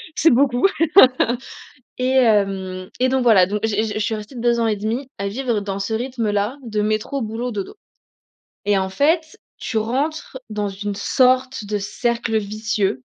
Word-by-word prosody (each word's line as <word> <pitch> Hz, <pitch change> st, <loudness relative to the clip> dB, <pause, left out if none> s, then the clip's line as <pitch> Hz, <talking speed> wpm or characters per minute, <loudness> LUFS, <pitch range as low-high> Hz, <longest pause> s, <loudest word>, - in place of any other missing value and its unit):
c'est 325 Hz, -, +4 dB
beaucoup. 255 Hz, +3 st, +3 dB, 1.3 s
Et 255 Hz, +1 st, 0 dB
hem, 195 Hz, -6 st, +1 dB
et 255 Hz, -, +3 dB
donc 260 Hz, 0 st, +1 dB
voilà, 205 Hz, -7 st, +5 dB
donc 210 Hz, +2 st, -2 dB
je -, -, +2 dB
je 215 Hz, -1 st, 0 dB
je -, -, -2 dB
suis 220 Hz, +1 st, 0 dB
restée 215 Hz, +5 st, -9 dB
2 235 Hz, 0 st, +1 dB
ans 230 Hz, -, +2 dB
et 210 Hz, -, 0 dB
1/2 235 Hz, +6 st, -3 dB
à 200 Hz, 0 st, -2 dB
vivre 235 Hz, -1 st, -1 dB
dans 200 Hz, -1 st, -4 dB
ce 220 Hz, +3 st, -2 dB
rythme 240 Hz, -2 st, -2 dB
là 205 Hz, +6 st, -1 dB
de 215 Hz, -2 st, -2 dB
métro, 215 Hz, +6 st, -1 dB
boulot, 225 Hz, +3 st, -3 dB
dodo, 200 Hz, -, -5 dB, 0.9 s
et 205 Hz, -1 st, +2 dB
en 190 Hz, 0 st, -1 dB
fait, 315 Hz, -, +1 dB, 0.2 s
tu 225 Hz, -, -2 dB
rentres 265 Hz, +5 st, -2 dB
dans 210 Hz, -1 st, -2 dB
une 200 Hz, +1 st, -4 dB
sorte 255 Hz, +2 st, +2 dB
de 210 Hz, 0 st, -1 dB
cercle 230 Hz, +2 st, -1 dB
vicieux 210 Hz, -, -2 dB
220 Hz, 175 wpm, -21 LUFS, 205-255 Hz, 1.3 s, voilà